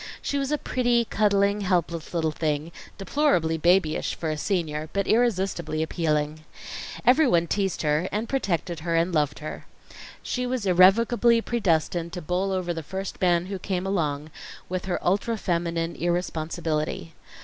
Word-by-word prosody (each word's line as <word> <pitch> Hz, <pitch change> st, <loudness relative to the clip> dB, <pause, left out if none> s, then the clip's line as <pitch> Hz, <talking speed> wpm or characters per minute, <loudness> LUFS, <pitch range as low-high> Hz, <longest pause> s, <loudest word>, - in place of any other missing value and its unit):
She 285 Hz, -, -2 dB
was 275 Hz, +1 st, -2 dB
a 300 Hz, -, +2 dB
pretty, 240 Hz, -4 st, +1 dB
cuddling, 205 Hz, -1 st, +2 dB
helpless 170 Hz, -4 st, -1 dB
little 160 Hz, -2 st, 0 dB
thing, 155 Hz, +1 st, -2 dB, 0.3 s
deplorably 195 Hz, -, +1 dB
babyish 170 Hz, -1 st, +2 dB
for 160 Hz, -2 st, -3 dB
a -, -, -1 dB
senior; 155 Hz, -3 st, -2 dB
but 200 Hz, -1 st, 0 dB
irresistibly 190 Hz, -8 st, +1 dB
appealing. 155 Hz, -1 st, -1 dB, 0.6 s
Everyone 250 Hz, -, +5 dB
teased 195 Hz, 0 st, -1 dB
her, 150 Hz, +4 st, +1 dB
and 215 Hz, +3 st, -2 dB
protected 180 Hz, -, -1 dB
her, 165 Hz, +1 st, -1 dB
and 170 Hz, +2 st, +1 dB
loved 150 Hz, -2 st, +1 dB
her. 155 Hz, -, -7 dB, 0.6 s
She 250 Hz, 0 st, -2 dB
was 250 Hz, -4 st, -2 dB
irrevocably 230 Hz, +6 st, +5 dB
predestined 170 Hz, -7 st, 0 dB
to 180 Hz, -, -4 dB
bowl 180 Hz, +4 st, -1 dB
over 180 Hz, -2 st, -1 dB
the 165 Hz, -, -4 dB
first 190 Hz, +5 st, -6 dB
man 175 Hz, -1 st, +3 dB
who 195 Hz, 0 st, -5 dB
came 185 Hz, -1 st, -2 dB
along, 155 Hz, -6 st, -1 dB, 0.4 s
with 185 Hz, +1 st, -3 dB
her 185 Hz, -2 st, -1 dB
ultra 205 Hz, +5 st, +1 dB
feminine 170 Hz, -2 st, -1 dB
irresponsibility. 160 Hz, -, -2 dB
180 Hz, 150 wpm, -25 LUFS, 160-200 Hz, 0.6 s, Everyone